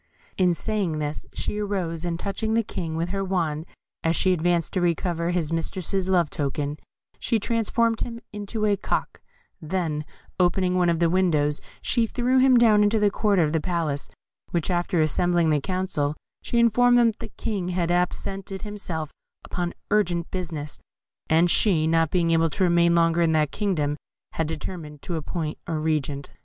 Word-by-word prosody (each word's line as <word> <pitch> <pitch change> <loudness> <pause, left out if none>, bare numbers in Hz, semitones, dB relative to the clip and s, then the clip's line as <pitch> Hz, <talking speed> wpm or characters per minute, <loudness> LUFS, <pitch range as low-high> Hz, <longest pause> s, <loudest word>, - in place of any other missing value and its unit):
In 180 -2 +3
saying 200 -6 -1
this, 150 0 -4
she 210 - -3
arose, 180 -5 -2
and 170 -1 -2
touching 220 +4 -2
the 230 - +3
King 165 -6 -4
with 165 +2 -1
her 195 +1 -2
wand 165 -4 -1 0.4
as 165 0 +1
he 185 - +4
advanced 175 -1 0
to 185 - 0
recover 170 0 0
his 170 -3 -1
mistress's 185 +3 -2
love 175 -5 +2
token, 145 +1 -2 0.4
she 235 - +1
transformed 230 +1 +1
him 230 -1 -3
into 210 +1 -3
a 205 -1 +3
cock; 200 - -3 0.4
then, 160 -2 -2 0.4
opening 180 +1 +2
one 180 -1 +3
of 170 - +2
the 170 0 +3
windows, 160 -5 +2 0.2
she 235 -2 +2
threw 250 +3 +1
him 260 -1 +6
down 220 -3 +5
into 210 +2 +3
the 210 -1 +3
court 210 -1 +1
of 160 -3 +2
the 160 - +1
palace; 160 -5 -2 0.6
after 175 +1 0
which, 160 - +4
assembling 170 +1 +2
the 150 -2 +2
Council, 180 -4 -1 0.3
she 235 - -2
informed 245 +1 +5
them 235 -1 +5
that 220 - -19
the 230 - -7
King 200 -6 -2
had 175 -1 0
absented 190 +2 -2
himself 180 -7 -5 0.3
upon 175 -1 -3 0.2
urgent 175 -5 +1
business, 160 -5 -5 0.5
and 165 +2 +4
she, 170 -8 +3
not 165 0 +2
being 170 -1 +1
able 165 0 +3
to 190 - -1
remain 170 -1 +4
longer 165 0 +3
in 165 -1 +3
that 155 -2 +2
kingdom, 160 -9 0 0.4
had 160 - -1
determined 155 -2 -6
to 175 - -3
appoint 160 0 -4
a 165 - -2
regent. 150 -3 -2
175 Hz, 175 wpm, -25 LUFS, 160-200 Hz, 0.6 s, him